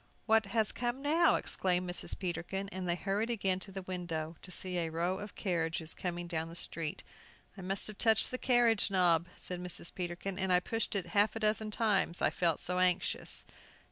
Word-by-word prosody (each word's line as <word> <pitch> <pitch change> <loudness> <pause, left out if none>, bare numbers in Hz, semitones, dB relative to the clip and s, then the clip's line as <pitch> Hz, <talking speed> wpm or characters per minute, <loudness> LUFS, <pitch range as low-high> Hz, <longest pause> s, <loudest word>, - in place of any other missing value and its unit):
"What 220 -2 +4
has 220 +1 +1
come 245 +3 -3
now?" 315 +4 +4
exclaimed 180 -1 0
Mrs. 175 - -3
Peterkin, 185 +2 -3
and 185 -2 -4
they 175 - +2
hurried 205 +5 -1
again 195 -5 0
to 195 - -5
the 190 0 -6
window, 170 -3 -4
to - - -8
see 180 0 +2
a 165 -1 -1
row 175 +4 -1
of 205 0 -8
carriages 165 -4 -1
coming 175 -1 -4
down 165 -1 -2
the 165 - -10
street. 165 -2 -4 0.5
"I 195 - -9
must 190 +2 -2
have 210 -2 -5
touched 220 -2 +4
the 255 - -3
carriage 240 -5 +4
knob," 175 -3 +3 0.2
cried 180 -1 -4
Mrs. 180 -1 -5
Peterkin, 180 +2 -4
"and 190 -1 0
I 180 - +6
pushed 225 +3 -2
it 195 - +1
half 205 +1 +3
a - - -3
dozen 215 0 +2
times 210 -5 +1
I - - +2
felt 170 -3 +1
so 180 0 0
anxious!" 180 -1 +1
185 Hz, 200 wpm, -33 LUFS, 175-210 Hz, 0.5 s, I